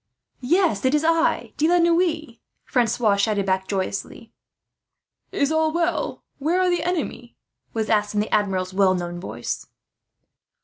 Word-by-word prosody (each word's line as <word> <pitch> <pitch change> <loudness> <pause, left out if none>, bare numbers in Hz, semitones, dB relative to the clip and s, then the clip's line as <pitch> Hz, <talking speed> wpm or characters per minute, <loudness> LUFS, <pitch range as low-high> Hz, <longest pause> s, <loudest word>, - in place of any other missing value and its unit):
"Yes, 345 - +2
it 260 +3 +3
is 300 - +1
I, 330 0 +1
De 310 - +2
la 350 +1 +4
Noue," 335 -6 +1 0.3
Francois 230 -4 +2
shouted 200 -1 +1
back 190 0 0
joyously. 200 +3 -4 1.0
"Is 280 +2 0
all 315 0 +2
well? 335 -2 -1 0.2
Where 325 +6 +1
are 365 -1 +2
the 350 - +1
enemy?" 315 -8 -3 0.4
was 220 -1 -1
asked, 210 -1 +1
in - - +2
the 210 - -2
Admiral's 190 -3 0
well 190 -1 +3
known 175 -1 -4
voice. 180 - -5
240 Hz, 145 wpm, -23 LUFS, 200-330 Hz, 1.0 s, la